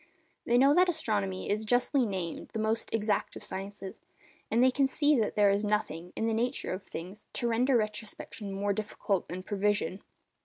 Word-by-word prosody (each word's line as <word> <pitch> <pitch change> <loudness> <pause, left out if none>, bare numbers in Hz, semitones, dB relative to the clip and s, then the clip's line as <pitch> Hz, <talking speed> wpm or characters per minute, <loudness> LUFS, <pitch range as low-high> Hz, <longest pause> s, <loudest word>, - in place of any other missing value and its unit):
They 240 - +3
know 275 +3 +6
that 360 +3 +5
astronomy 100 - -1
is 215 +2 0
justly 245 +3 +2
named 185 -4 -4
the - - -2
most 220 +1 -1
exact 215 -2 0
of - - -8
the - - -3
sciences, 195 0 -6 0.5
and 235 +2 +3
they 260 - +6
can 275 +1 +3
see 290 0 +3
that 215 - 0
there 205 -1 +5
is 200 +1 +1
nothing, 180 -5 -1
in 225 - -1
the 225 - +1
nature 245 +1 -1
of 185 - -4
things, 185 +2 -8
to 240 - -1
render 245 +3 +3
retrospection 215 -1 -4
more 200 +1 0
difficult 205 -2 -2
than 185 +2 -6
prevision. 205 -2 0
210 Hz, 190 wpm, -30 LUFS, 195-240 Hz, 0.5 s, know